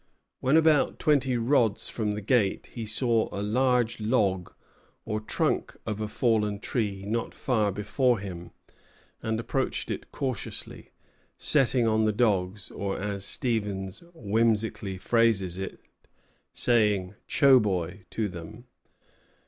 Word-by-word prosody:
When 135 Hz, +5 st, +3 dB
about 160 Hz, -3 st, +3 dB
twenty 135 Hz, -4 st, +2 dB
rods 115 Hz, -3 st, +2 dB
from 105 Hz, -2 st, -2 dB
the 105 Hz, -, -4 dB
gate, 105 Hz, -2 st, +1 dB
he 115 Hz, -2 st, -5 dB
saw 115 Hz, 0 st, +1 dB
a 100 Hz, -, -3 dB
large 120 Hz, +1 st, +1 dB
log, 105 Hz, -5 st, 0 dB, 0.5 s
or 110 Hz, -1 st, -2 dB
trunk 110 Hz, -, -1 dB
of 110 Hz, -1 st, -3 dB
a 110 Hz, -, -1 dB
fallen 105 Hz, -2 st, +1 dB
tree, 100 Hz, -3 st, -2 dB
not 115 Hz, +2 st, -2 dB
far 110 Hz, -6 st, +1 dB
before 115 Hz, +5 st, +1 dB
him, 90 Hz, -4 st, -7 dB, 0.7 s
and 110 Hz, 0 st, -1 dB
approached 115 Hz, -, -2 dB
it -, -, -6 dB
cautiously, 130 Hz, -6 st, -5 dB, 0.5 s
setting 130 Hz, -4 st, +3 dB
on 110 Hz, 0 st, +2 dB
the 110 Hz, -, +3 dB
dogs, 100 Hz, -3 st, 0 dB
or, 100 Hz, -1 st, -3 dB
as 100 Hz, -1 st, -3 dB
Stevens 100 Hz, -6 st, -1 dB
whimsically 110 Hz, -, 0 dB
phrases 95 Hz, -3 st, +1 dB
it, 95 Hz, -, -5 dB, 0.7 s
"saying 105 Hz, -6 st, +2 dB
Choboy!" 100 Hz, -, +3 dB
to 110 Hz, -2 st, -1 dB
them. 100 Hz, +7 st, -9 dB
110 Hz, 125 wpm, -27 LUFS, 100-120 Hz, 0.7 s, When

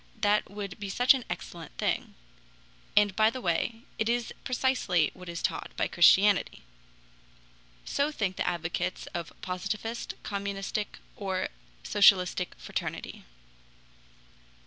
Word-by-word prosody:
That 210 Hz, 0 st, +2 dB
would 200 Hz, -1 st, -6 dB
be 200 Hz, -1 st, -5 dB
such 245 Hz, +7 st, +5 dB
an 260 Hz, -2 st, -3 dB
excellent 165 Hz, -3 st, -7 dB
thing. -, -, -1 dB, 0.8 s
And 205 Hz, -2 st, +5 dB
by 215 Hz, +1 st, +5 dB
the 255 Hz, +3 st, -5 dB
way, 225 Hz, +4 st, -1 dB, 0.2 s
it 220 Hz, +1 st, +1 dB
is 240 Hz, -1 st, 0 dB
precisely 250 Hz, -, +1 dB
what 180 Hz, -1 st, -10 dB
is 170 Hz, -1 st, -5 dB
taught -, -, -2 dB
by -, -, +1 dB
Christianity." 190 Hz, +3 st, +5 dB, 1.2 s
So 285 Hz, +2 st, 0 dB
think 200 Hz, -10 st, -1 dB
the -, -, -1 dB
advocates 175 Hz, +1 st, -2 dB
of 170 Hz, -2 st, -4 dB
Positivist, 215 Hz, +5 st, -3 dB
Communistic, 200 Hz, +1 st, -3 dB, 0.2 s
or 190 Hz, -2 st, -2 dB, 0.3 s
Socialistic 185 Hz, -3 st, +4 dB
fraternity. -, -, -5 dB
200 Hz, 120 wpm, -29 LUFS, 180-220 Hz, 1.2 s, such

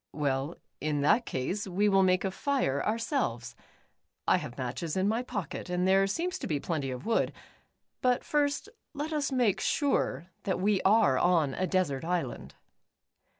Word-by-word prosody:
"Well, 140 Hz, +1 st, -1 dB, 0.2 s
in 150 Hz, -1 st, -1 dB
that 225 Hz, +12 st, +3 dB
case, 185 Hz, +11 st, -2 dB
we 195 Hz, +3 st, +1 dB
will 195 Hz, -1 st, +4 dB
make 185 Hz, 0 st, +3 dB
a 190 Hz, -, 0 dB
fire 225 Hz, -, 0 dB
our 215 Hz, +2 st, 0 dB
selves. 230 Hz, -, -2 dB, 0.7 s
I -, -, +5 dB
have 125 Hz, -, -7 dB
matches 140 Hz, +6 st, -3 dB
in 190 Hz, +1 st, +2 dB
my 225 Hz, +3 st, +1 dB
pocket, 205 Hz, -7 st, -5 dB
and 180 Hz, +1 st, +1 dB
there, 195 Hz, +1 st, +4 dB
seems 355 Hz, -, -2 dB
to -, -, -4 dB
be 150 Hz, -3 st, 0 dB
plenty 145 Hz, -3 st, -2 dB
of 125 Hz, +1 st, -6 dB
wood. 230 Hz, -, +1 dB, 0.7 s
But 250 Hz, -1 st, +2 dB
first, 295 Hz, +4 st, 0 dB, 0.3 s
let 300 Hz, +3 st, -3 dB
us 290 Hz, -2 st, 0 dB
make 235 Hz, -7 st, +2 dB
sure 270 Hz, -, 0 dB
that 190 Hz, -2 st, -1 dB
we 200 Hz, 0 st, +2 dB
are 200 Hz, -, +4 dB
on 165 Hz, -6 st, +3 dB
a 185 Hz, -, -1 dB
desert 175 Hz, -9 st, 0 dB
island." 170 Hz, -6 st, -3 dB
185 Hz, 170 wpm, -29 LUFS, 150-230 Hz, 0.7 s, I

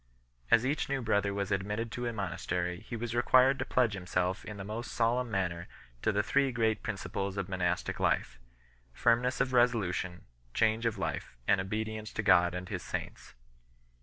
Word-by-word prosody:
As 115 Hz, +1 st, +5 dB
each 140 Hz, +2 st, 0 dB
new 140 Hz, -1 st, 0 dB
brother 100 Hz, -4 st, +1 dB
was 100 Hz, 0 st, -2 dB
admitted 105 Hz, +4 st, -1 dB
to 120 Hz, 0 st, -3 dB
a -, -, -1 dB
monastery 90 Hz, -3 st, -2 dB
he 120 Hz, -, -7 dB
was 115 Hz, 0 st, -4 dB
required 130 Hz, +3 st, +5 dB
to -, -, -1 dB
pledge 120 Hz, -4 st, +2 dB
himself 90 Hz, -1 st, -1 dB
in 105 Hz, -, -7 dB
the 95 Hz, -, -5 dB
most 110 Hz, +4 st, -5 dB
solemn 120 Hz, +1 st, +1 dB
manner 90 Hz, -4 st, -2 dB, 0.3 s
to -, -, +2 dB
the 105 Hz, 0 st, +1 dB
three 135 Hz, +5 st, +2 dB
great 110 Hz, -3 st, +1 dB
principles 100 Hz, -2 st, -3 dB
of 100 Hz, -2 st, -2 dB
monastic 90 Hz, -2 st, -1 dB
life, -, -, 0 dB, 0.5 s
firmness 120 Hz, -, +2 dB
of 130 Hz, -, +1 dB
resolution, 100 Hz, -7 st, +1 dB, 0.3 s
change 110 Hz, +1 st, +2 dB
of 110 Hz, -2 st, -2 dB
life, 90 Hz, -9 st, -4 dB
and 100 Hz, -1 st, +4 dB
obedience 110 Hz, +2 st, -4 dB
to 115 Hz, -, -2 dB
God 85 Hz, -2 st, +5 dB
and 90 Hz, 0 st, -5 dB
His 95 Hz, -4 st, -3 dB
saints -, -, -6 dB
2 -, -, -33 dB
105 Hz, 180 wpm, -31 LUFS, 95-120 Hz, 0.5 s, As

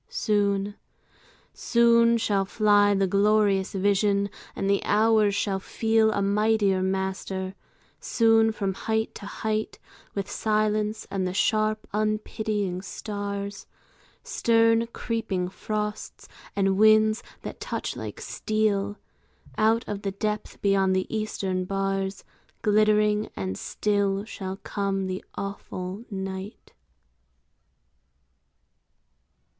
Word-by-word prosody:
Soon, 205 Hz, -, 0 dB, 0.8 s
soon 235 Hz, 0 st, +4 dB
shall 205 Hz, -3 st, +1 dB
fly 205 Hz, 0 st, +3 dB
The 195 Hz, 0 st, +2 dB
glorious 200 Hz, 0 st, +2 dB
vision, 200 Hz, 0 st, +2 dB, 0.2 s
and 195 Hz, -, -2 dB
the 200 Hz, 0 st, +2 dB
hours 215 Hz, -1 st, +3 dB
shall 195 Hz, -2 st, 0 dB
feel 220 Hz, +2 st, +2 dB
A 200 Hz, -, 0 dB
mightier 205 Hz, -1 st, +2 dB
master; 190 Hz, 0 st, -2 dB, 0.5 s
soon 225 Hz, -1 st, +3 dB
from 195 Hz, -3 st, -2 dB
height 220 Hz, +3 st, -1 dB
to 200 Hz, -, -9 dB
height, 215 Hz, 0 st, -3 dB, 0.4 s
With 200 Hz, -1 st, -2 dB
silence 215 Hz, 0 st, 0 dB
and 190 Hz, -2 st, -1 dB
the 180 Hz, -, -4 dB
sharp 215 Hz, +1 st, +1 dB
unpitying 215 Hz, -3 st, -1 dB
stars, 200 Hz, 0 st, -5 dB, 0.6 s
Stern 230 Hz, 0 st, +3 dB
creeping 225 Hz, -6 st, -2 dB
frosts, 210 Hz, +2 st, -4 dB, 0.3 s
and 195 Hz, -1 st, +2 dB
winds 215 Hz, +1 st, +5 dB, 0.2 s
that -, -, -7 dB
touch -, -, -4 dB
like -, -, -6 dB
steel, 210 Hz, -2 st, -1 dB, 0.6 s
Out 225 Hz, +2 st, +2 dB
of 205 Hz, -1 st, -4 dB
the 195 Hz, -1 st, -3 dB
depth 210 Hz, +1 st, -3 dB
beyond 195 Hz, -1 st, +3 dB
the 185 Hz, -, +1 dB
eastern 195 Hz, -4 st, -2 dB
bars, 195 Hz, 0 st, -2 dB, 0.4 s
Glittering 210 Hz, 0 st, +3 dB
and 95 Hz, -1 st, -3 dB
still 200 Hz, -, 0 dB
shall 190 Hz, -3 st, -6 dB
come 195 Hz, -1 st, -2 dB
the 185 Hz, 0 st, -4 dB
awful 195 Hz, +1 st, -6 dB
night. 190 Hz, 0 st, -6 dB
205 Hz, 105 wpm, -26 LUFS, 195-215 Hz, 0.8 s, winds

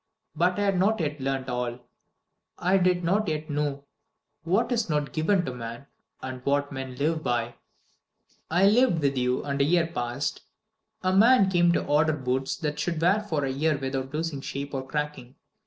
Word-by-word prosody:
But 180 Hz, +4 st, +2 dB
I 205 Hz, -, +1 dB
had 195 Hz, -2 st, +1 dB
not 215 Hz, +3 st, +2 dB
yet 150 Hz, -2 st, -2 dB
learnt 135 Hz, 0 st, -2 dB
all. 125 Hz, -1 st, -2 dB, 0.8 s
I 190 Hz, +2 st, +2 dB
did 180 Hz, -1 st, +2 dB
not 200 Hz, +5 st, +1 dB
yet 155 Hz, -1 st, -3 dB
know 145 Hz, -1 st, -2 dB, 0.6 s
What 200 Hz, +9 st, +1 dB
is 230 Hz, -5 st, 0 dB
not 150 Hz, -2 st, -1 dB
given 175 Hz, +3 st, +1 dB
to 130 Hz, -, -4 dB
man, 120 Hz, +2 st, -7 dB, 0.4 s
and 130 Hz, -1 st, -6 dB
What 140 Hz, +1 st, 0 dB
men 130 Hz, -2 st, -6 dB
live 155 Hz, +4 st, 0 dB
by. 120 Hz, -3 st, -1 dB, 1.0 s
"I 175 Hz, +4 st, +3 dB
lived 220 Hz, -3 st, +4 dB
with 140 Hz, -1 st, +2 dB
you, 125 Hz, 0 st, 0 dB
and 140 Hz, -1 st, -1 dB
a -, -, +5 dB
year 170 Hz, +3 st, +3 dB
passed. 135 Hz, -3 st, -3 dB, 0.6 s
A 185 Hz, 0 st, +2 dB
man 215 Hz, -1 st, +6 dB
came 175 Hz, -1 st, +4 dB
to -, -, 0 dB
order 150 Hz, +2 st, +3 dB
boots 130 Hz, -1 st, -1 dB
that 150 Hz, -4 st, -3 dB
should 165 Hz, +1 st, -1 dB
wear 180 Hz, +6 st, +3 dB
for 160 Hz, -9 st, -2 dB
a 135 Hz, -, -1 dB
year 150 Hz, +3 st, +1 dB
without 135 Hz, -1 st, -3 dB
losing 155 Hz, -2 st, -3 dB
shape 140 Hz, +1 st, -5 dB
or 135 Hz, -1 st, -4 dB
cracking. 150 Hz, -3 st, -4 dB
150 Hz, 185 wpm, -26 LUFS, 135-175 Hz, 1.0 s, man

